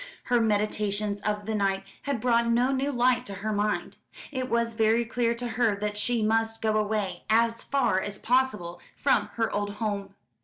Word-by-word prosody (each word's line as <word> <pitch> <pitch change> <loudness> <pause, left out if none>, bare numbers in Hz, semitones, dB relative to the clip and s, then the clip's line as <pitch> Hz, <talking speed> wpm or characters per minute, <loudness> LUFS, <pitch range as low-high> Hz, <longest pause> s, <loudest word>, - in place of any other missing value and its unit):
Her 245 -2 +2
meditations 210 -1 0
of 210 -1 -2
the 220 - -2
night 195 -2 0 0.2
had 280 -4 -2
brought 235 0 +2
no 240 +3 +3
new 275 +1 0
light 245 -1 +2
to 200 - -5
her 215 - 0
mind. 210 0 -1 0.3
It 260 -2 -3
was 235 0 +1
very 225 +1 +2
clear 235 0 0
to 245 +1 -4
her 230 -2 +1
that 210 +1 -3
she 225 +2 0
must 225 +1 +1
go 220 -1 0
away 205 -4 -1
as 230 +1 +3
far 265 -9 +1
as 205 0 -4
possible 215 -9 0
from - - +2
her 225 -1 0
old 205 0 -1
home. 200 -3 -3
220 Hz, 185 wpm, -27 LUFS, 205-235 Hz, 0.3 s, no